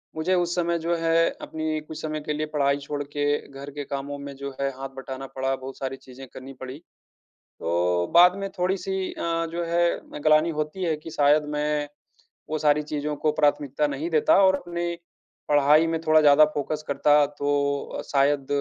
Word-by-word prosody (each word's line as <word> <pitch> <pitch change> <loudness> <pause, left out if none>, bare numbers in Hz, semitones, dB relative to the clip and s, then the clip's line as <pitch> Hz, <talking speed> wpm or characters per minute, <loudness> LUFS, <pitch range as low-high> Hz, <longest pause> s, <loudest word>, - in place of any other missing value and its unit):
मुझे 160 +4 0
उस 175 -1 0
समय 170 -1 0
जो 170 +1 0
है 165 0 +3
अपनी 155 -1 -3
कुछ 155 +1 -9
समय 155 -1 -3
के 150 0 -3
लिए 150 +1 -2
पढ़ाई 140 -2 +1
छोड़ 145 +1 -5
के 145 0 -3 0.2
घर 140 0 -9
के 145 +1 -5
कामों 140 +1 -5
में 140 0 -8
जो 140 +1 -6
है 140 0 0
हाथ 135 +1 -6
बटाना 135 0 -6
पड़ा, 135 0 -2
बहुत 130 0 -9
सारी 135 0 -4
चीज़ें 130 0 -12
करनी 130 +1 -9
पड़ी। 130 +1 -8 0.8
तो 85 +1 0
बाद 180 +2 +7
में 195 0 -4
थोड़ी-सी 190 +1 -1
अ, - - -8 0.3
जो 170 +1 -2
है 170 +1 +2
अ, - - -11
ग्लानि 155 +1 +4
होती 155 +5 -3
है 165 -3 +1
कि 155 +2 -10
शायद 150 0 +3
मैं 150 0 -1 0.6
वो 155 - -1
सारी 150 0 +3
चीज़ों 150 0 -3
को 155 +1 +1
प्राथमिकता 145 -1 +1
नहीं 145 +3 -3
देता 155 -2 +4
और 190 0 +5
अपने 175 -2 -5 0.6
पढ़ाई 150 +2 +5
में 165 0 -1
थोड़ा 155 0 +6
ज़्यादा 150 0 +7
फोकस 150 +2 -3
करता 145 +1 +4
तो 145 0 0 0.5
अ, - - -3
शायद 140 0 +2
150 Hz, 190 wpm, -25 LUFS, 140-160 Hz, 0.8 s, बाद